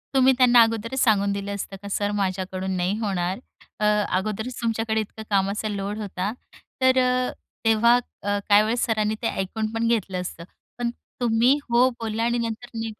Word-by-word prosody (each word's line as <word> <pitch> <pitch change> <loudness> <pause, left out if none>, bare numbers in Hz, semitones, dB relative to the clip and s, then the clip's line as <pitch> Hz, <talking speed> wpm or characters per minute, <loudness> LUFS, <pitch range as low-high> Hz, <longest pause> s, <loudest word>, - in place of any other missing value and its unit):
तुम्ही 265 0 +6
त्यांना 245 -2 +7
अगोदरच 230 +3 -2
सांगून 200 -4 +3
दिलं 200 0 -4
असतं 195 0 -6
का, 200 - -8
"सर, 205 +1 -1
माझ्याकडून 190 -1 -2
नाही 180 +3 0
होणार?" 190 -2 -1 0.4
अ, 210 - +1 0.3
अगोदरच 215 +6 -4
तुमच्याकडे 225 -1 0
इतकं 220 +1 -8
कामाचा 200 +2 0
लोड 200 0 -3
होता, 200 -1 -3 0.5
तर 260 0 +4
अ, 250 0 +1 0.3
तेव्हा 225 +2 +5 0.3
अ, 205 0 0
काही 205 0 +7
वेळेस 230 +3 0
सरांनी 215 -2 0
ते 230 - 0
ऐकून 215 +3 -2
पण 230 0 0
घेतलं 200 -5 0
असतं. 170 -2 -7 0.3
पण 240 -1 -1 0.3
तुम्ही 240 +3 +4
हो 240 +2 +5
बोला 225 0 -2
आणि 240 +1 +1
नंतर 230 +1 -3
नाही 225 0 -4
220 Hz, 170 wpm, -24 LUFS, 200-235 Hz, 0.5 s, त्यांना